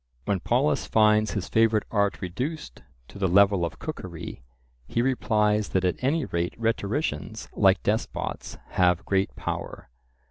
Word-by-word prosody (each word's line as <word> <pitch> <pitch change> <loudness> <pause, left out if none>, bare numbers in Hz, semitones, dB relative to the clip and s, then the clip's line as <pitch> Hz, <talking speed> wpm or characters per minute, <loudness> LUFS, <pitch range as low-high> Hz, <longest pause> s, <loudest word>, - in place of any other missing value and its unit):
When 100 -2 0
Polus 125 +10 +1
finds 110 0 +3
his 95 -3 -3
favourite 110 -1 +3
art 100 -2 +1
reduced 125 - -5 0.3
to 100 - -12
the 95 - +2
level 100 0 +4
of 85 - -3
cookery, - - -7 0.5
he - - -2
replies 105 -4 +1
that 95 -1 +1
at 90 +7 -1
any 145 +2 +1
rate 85 -3 -2
rhetoricians, 115 - -2
like - - +3
despots, - - -2
have 90 -2 +2
great 95 0 0
power. - - -5
105 Hz, 140 wpm, -26 LUFS, 95-115 Hz, 0.5 s, level